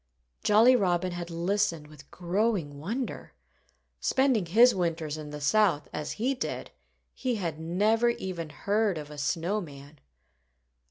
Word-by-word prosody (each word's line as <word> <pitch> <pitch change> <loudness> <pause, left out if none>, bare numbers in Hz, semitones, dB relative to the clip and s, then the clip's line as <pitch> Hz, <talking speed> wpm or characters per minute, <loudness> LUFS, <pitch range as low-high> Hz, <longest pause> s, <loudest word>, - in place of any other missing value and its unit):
Jolly 225 +5 +6
Robin 185 -4 +1
had 175 0 -5
listened 170 -1 0
with 150 -2 -15
growing 180 -5 -1
wonder. 230 - -4 0.7
Spending 260 -9 +2
his 235 +8 +6
winters 165 -4 -2
in 155 -1 -7
the 150 0 -7
South, 165 0 +2
as 150 0 -4
he 250 +5 0
did, 260 - -5 0.4
he 255 -2 -2
had 170 -7 -3
never 210 +8 +2
even 185 -8 -4
heard 200 +5 0
of 150 -1 -7
a 150 - -8
snow 175 +8 -1
man. 145 -2 -12
175 Hz, 140 wpm, -28 LUFS, 155-215 Hz, 0.7 s, Jolly